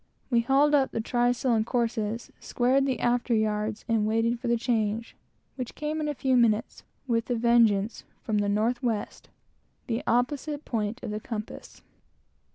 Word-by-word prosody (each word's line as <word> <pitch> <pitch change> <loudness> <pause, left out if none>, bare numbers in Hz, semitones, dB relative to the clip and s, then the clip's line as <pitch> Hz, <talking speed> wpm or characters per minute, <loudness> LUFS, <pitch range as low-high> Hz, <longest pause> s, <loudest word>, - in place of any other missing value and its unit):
We 235 - +4
hauled 275 +5 +3
up 275 -2 +4
the - - -4
trysail 245 +2 +1
and 220 -1 +2
courses, 230 -1 -2
squared 265 +3 +1
the 260 -3 -1
after 240 0 +1
yards, 215 0 -1
and 220 -2 +1
waited 225 +2 +1
for 245 - -5
the 235 0 +2
change, 225 -1 -1 0.4
which 255 -3 -5
came 305 +1 -3
in 300 - -1
a 295 - -2
few 260 0 +1
minutes, 230 -3 +2 0.2
with 230 -2 -1
a 245 - +1
vengeance, 230 -3 +3 0.2
from 215 -2 0
the 205 0 0
north 220 +4 +1
west, 230 -5 -3 0.6
the 230 -4 -2
opposite 285 +5 0
point 225 +1 -3
of - - -4
the 210 - -3
compass. 215 -1 -7
235 Hz, 165 wpm, -27 LUFS, 220-250 Hz, 0.6 s, We